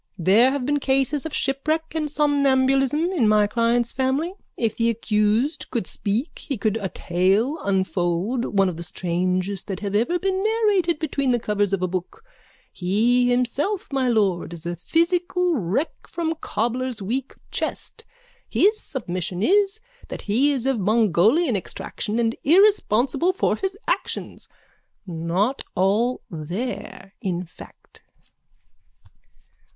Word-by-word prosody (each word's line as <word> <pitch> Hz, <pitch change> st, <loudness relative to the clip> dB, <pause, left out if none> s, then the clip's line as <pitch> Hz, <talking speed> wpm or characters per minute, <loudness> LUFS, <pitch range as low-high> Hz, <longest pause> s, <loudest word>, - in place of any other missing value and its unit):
There 200 Hz, +8 st, +5 dB
have 270 Hz, -2 st, -2 dB
been 290 Hz, +1 st, +1 dB
cases 270 Hz, +2 st, 0 dB
of 320 Hz, -, -10 dB
shipwreck 310 Hz, +4 st, -1 dB
and 310 Hz, -2 st, -1 dB
somnambulism 280 Hz, +1 st, +2 dB
in 285 Hz, -, +2 dB
my 210 Hz, -1 st, +4 dB
client's 235 Hz, +2 st, +1 dB
family. 270 Hz, +7 st, 0 dB, 0.2 s
If 225 Hz, -2 st, 0 dB
the 230 Hz, 0 st, +2 dB
accused 230 Hz, +6 st, 0 dB
could 235 Hz, -7 st, -2 dB
speak 215 Hz, -, -3 dB
he 275 Hz, -5 st, -4 dB
could 215 Hz, +1 st, 0 dB
a 200 Hz, -4 st, -3 dB
tale 195 Hz, -, +1 dB
unfold—one 195 Hz, +2 st, 0 dB
of 175 Hz, -3 st, -3 dB
the -, -, -6 dB
strangest 185 Hz, +3 st, -2 dB
that 195 Hz, -1 st, -4 dB
have 200 Hz, -1 st, -3 dB
ever 240 Hz, +12 st, +2 dB
been 385 Hz, +1 st, -1 dB
narrated 415 Hz, -7 st, +2 dB
between 280 Hz, -3 st, -1 dB
the 240 Hz, -1 st, +2 dB
covers 205 Hz, -2 st, 0 dB
of 195 Hz, -2 st, 0 dB
a -, -, +2 dB
book. 185 Hz, -, -5 dB, 0.5 s
He 235 Hz, +7 st, +2 dB
himself, 275 Hz, -, -1 dB
my 265 Hz, -2 st, +1 dB
lord, 200 Hz, -7 st, +1 dB
is 165 Hz, -1 st, -9 dB
a 175 Hz, 0 st, -2 dB
physical 350 Hz, -, +1 dB
wreck 220 Hz, -, -1 dB
from 330 Hz, -2 st, -2 dB
cobbler's 240 Hz, +2 st, -2 dB
weak 245 Hz, +7 st, -3 dB, 0.2 s
chest. 450 Hz, -, -4 dB, 0.5 s
His 425 Hz, +2 st, +3 dB
submission 185 Hz, -, -4 dB
is 400 Hz, -, +3 dB, 0.3 s
that -, -, -7 dB
he 250 Hz, +8 st, +2 dB
is 260 Hz, -4 st, -2 dB
of 265 Hz, -4 st, +1 dB
Mongolian 220 Hz, -, +3 dB
extraction 210 Hz, +3 st, -4 dB
and 230 Hz, -1 st, +1 dB
irresponsible 340 Hz, -, +3 dB
for 375 Hz, -, +1 dB
his 385 Hz, -1 st, -3 dB
actions. -, -, -3 dB, 0.6 s
Not 180 Hz, +8 st, -1 dB
all 215 Hz, +7 st, +1 dB
there, 190 Hz, +5 st, -6 dB
in 180 Hz, -1 st, -2 dB
fact. 170 Hz, -, -16 dB
240 Hz, 135 wpm, -23 LUFS, 195-295 Hz, 0.6 s, There